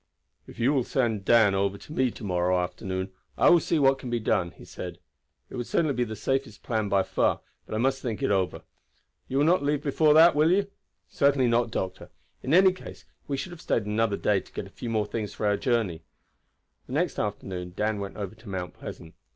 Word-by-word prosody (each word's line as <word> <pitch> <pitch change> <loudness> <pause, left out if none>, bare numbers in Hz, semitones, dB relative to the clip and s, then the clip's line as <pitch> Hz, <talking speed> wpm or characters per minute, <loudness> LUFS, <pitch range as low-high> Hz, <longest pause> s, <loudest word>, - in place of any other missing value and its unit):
"If - - -13
you 125 +5 +2
will 135 -3 +2
send 115 -6 -1
Dan 110 -3 +5
over 100 0 0
to 150 - -11
me 130 -4 +2
to 115 - -11
morrow 90 -1 +1
afternoon 95 +1 -3 0.3
I - - +6
will 175 - +7
see 165 - 0
what 135 -2 +4
can 125 - -6
be 120 0 0
done," 90 -5 +1
he - - -15
said. - - -7 0.5
"It - - -8
would 120 - -4
certainly 155 -4 +1
be 125 - 0
the 110 -2 -5
safest 135 -1 -2
plan 110 -3 -1
by 100 -1 +3
far; - - 0 0.3
but - - -4
I - - 0
must 135 +3 +1
think 115 -5 -4
it - - +2
over. 95 -2 0 0.6
You 135 - -2
will 145 - +4
not 175 +1 +4
leave 145 0 0
before 150 +1 +3
that, 165 +2 +8
will 150 +2 +3
you?" 200 +1 +1 0.4
"Certainly 140 -3 +2
not, 120 0 +2
doctor. 95 -4 -4 0.3
In 130 - -3
any 185 +3 +7
case 185 - -11 0.2
we 140 - -2
should 175 - -5
have 175 - -10
stayed 110 - 0
another 105 0 0
day 105 -2 +2
to - - -16
get - - -5
a 95 - -14
few 120 - -6
more 110 -2 +1
things 105 -1 -4
for - - -3
our 105 0 +3
journey." 110 - 0 0.9
The - - -8
next - - 0
afternoon 95 -3 -4
Dan 105 0 0
went 100 -1 -6
over 100 -1 -5
to 110 -1 -14
Mount 90 -2 -4
Pleasant. 80 - -9
115 Hz, 225 wpm, -27 LUFS, 100-135 Hz, 0.9 s, that